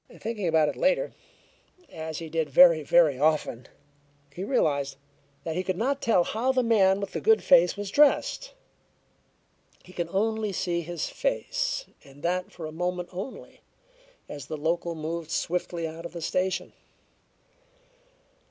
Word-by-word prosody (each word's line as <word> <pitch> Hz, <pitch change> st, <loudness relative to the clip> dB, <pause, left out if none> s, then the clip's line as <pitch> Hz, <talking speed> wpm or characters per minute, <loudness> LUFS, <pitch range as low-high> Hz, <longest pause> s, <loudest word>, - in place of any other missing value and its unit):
Thinking 215 Hz, -4 st, -3 dB
about 160 Hz, -2 st, +3 dB
it -, -, -2 dB
later, -, -, +1 dB, 0.8 s
as 160 Hz, -1 st, -6 dB
he 165 Hz, -, -6 dB
did 160 Hz, 0 st, -2 dB
very, 170 Hz, -3 st, +7 dB
very 150 Hz, -3 st, +3 dB
often, 150 Hz, -5 st, 0 dB, 0.7 s
he 180 Hz, -, -5 dB
realized 140 Hz, -, 0 dB, 0.5 s
that 160 Hz, -1 st, -4 dB
he 180 Hz, -, 0 dB
could 185 Hz, -1 st, -3 dB
not 275 Hz, +6 st, 0 dB
tell 190 Hz, -6 st, +3 dB
how 235 Hz, +8 st, 0 dB
the 260 Hz, -1 st, +1 dB
man 200 Hz, -4 st, +4 dB
with 200 Hz, -, -5 dB
the -, -, -4 dB
"good 445 Hz, 0 st, +4 dB
face" 180 Hz, -8 st, +5 dB
was 205 Hz, -1 st, -5 dB
dressed; 300 Hz, -, +3 dB, 1.3 s
he 185 Hz, -, -15 dB
could 175 Hz, -2 st, -3 dB
see 170 Hz, -, -16 dB
only 220 Hz, +1 st, 0 dB, 0.3 s
his 170 Hz, 0 st, -4 dB
face, -, -, -2 dB, 0.2 s
and 140 Hz, 0 st, -17 dB
that 180 Hz, +1 st, -1 dB
for 170 Hz, -, -8 dB
a 155 Hz, -, -6 dB
moment 180 Hz, +2 st, -3 dB
only, 190 Hz, +8 st, -8 dB, 0.7 s
as 145 Hz, -3 st, -8 dB
the 155 Hz, -, -5 dB
local 170 Hz, +2 st, -1 dB
moved 160 Hz, +1 st, -5 dB
swiftly 170 Hz, 0 st, -2 dB
out 165 Hz, +2 st, -7 dB
of -, -, -19 dB
the 170 Hz, -, -6 dB
station. 185 Hz, +3 st, -1 dB
175 Hz, 150 wpm, -27 LUFS, 160-215 Hz, 1.3 s, very